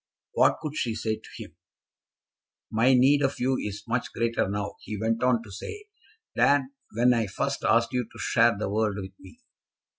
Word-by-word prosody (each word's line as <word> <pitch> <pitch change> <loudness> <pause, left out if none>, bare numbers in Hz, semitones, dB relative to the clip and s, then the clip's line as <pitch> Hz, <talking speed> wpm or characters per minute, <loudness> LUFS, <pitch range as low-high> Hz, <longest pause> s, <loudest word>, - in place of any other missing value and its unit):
What - - +4
could 150 -1 -4
she 115 -6 -1
say 110 -1 -2
to - - -16
him? - - -10 1.2
"My 120 +4 +4
need 135 +3 +4
of 135 0 0
you 130 +1 +1
is 105 0 -5
much 120 +1 -2
greater 115 -3 0
now," 100 0 -4
he 105 -2 -6
went 115 +2 0
on 125 -2 +2
to 105 - -13
say, 415 - -8 0.5
"than 140 -1 +3 0.2
when 125 +1 +5
I 115 -3 0
first 95 - -3
asked 115 +2 +2
you 125 -1 0
to - - -14
share 115 -2 +3
the 105 - -2
world 105 0 0
with 95 -1 -7
me. 95 - -16
115 Hz, 185 wpm, -26 LUFS, 105-125 Hz, 1.2 s, when